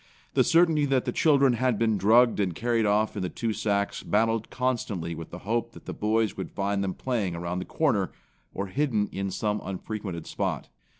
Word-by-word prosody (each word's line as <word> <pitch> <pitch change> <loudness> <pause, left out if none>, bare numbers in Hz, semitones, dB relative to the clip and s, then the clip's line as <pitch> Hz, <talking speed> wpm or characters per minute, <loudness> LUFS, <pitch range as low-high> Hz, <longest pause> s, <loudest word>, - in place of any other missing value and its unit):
The - - +4
certainty 165 -3 +4
that 135 -2 +1
the - - 0
children 140 -5 +4
had 125 -1 +1
been 110 -1 +2
drugged 115 +4 +4
and 90 -4 0
carried 115 0 +1
off 105 +2 +2
in 100 - -3
the 90 - -2
two 115 +3 -2
sacks 100 -1 -1
battled 115 +1 +1
constantly 110 -10 -2
with 80 0 -8
the 90 - -8
hope 115 +2 -1
that - - -14
the - - -5
boys 110 0 0
would 95 - -5
find 100 0 -1
them 95 -1 -2
playing 110 -9 -2
around 85 +1 -3
the 90 - -5
corner, 115 -12 0 0.4
or 100 - -3
hidden 110 -1 0
in 95 0 -3
some 105 +2 -1
unfrequented 95 -2 -5
spot. - - -3
105 Hz, 195 wpm, -27 LUFS, 95-120 Hz, 0.4 s, The